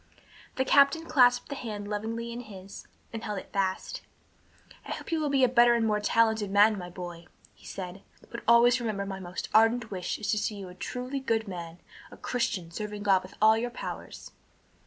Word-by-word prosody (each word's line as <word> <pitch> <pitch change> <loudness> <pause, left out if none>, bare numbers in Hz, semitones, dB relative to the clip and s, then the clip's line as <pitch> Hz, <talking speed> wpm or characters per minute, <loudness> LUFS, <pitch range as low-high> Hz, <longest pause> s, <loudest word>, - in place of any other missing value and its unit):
The 260 - 0
captain 280 +5 +4
clasped 250 -6 +4
the - - -3
hand 215 -6 -6
lovingly 225 +3 -3
in 235 - -6
his, 200 -4 -10 0.3
and 225 0 -5
held 210 -2 -3
it - - -9
fast. 190 -1 -2 0.8
"I - - -5
hope - - -8
you 325 - +1
will 300 -2 0
be 275 -2 +3
a - - +7
better 240 -1 +5
and 230 -1 +1
more 210 -1 +1
talented 220 -1 +2
man, 205 +2 +5
my 180 -3 -7
boy," 175 -2 -8 0.3
he - - -17
said, 185 0 -7 0.3
"but 235 - -6
always 235 +1 +6
remember 210 -4 -2
my 195 -1 -5
most 180 -1 -6
ardent 225 +1 +4
wish 185 -2 -3
is 210 -1 -2
to 215 - +1
see 210 - -2
you 195 -2 -8
a - - -10
truly 250 +7 -4
good 225 -4 -1
man, 170 -3 -7 0.3
a - - -13
Christian, 230 -9 -2
serving 210 +2 -5
God 195 -2 +4
with 185 - -13
all 220 0 +7
your 235 +2 -1
powers." 240 - -8
215 Hz, 200 wpm, -28 LUFS, 195-240 Hz, 0.8 s, a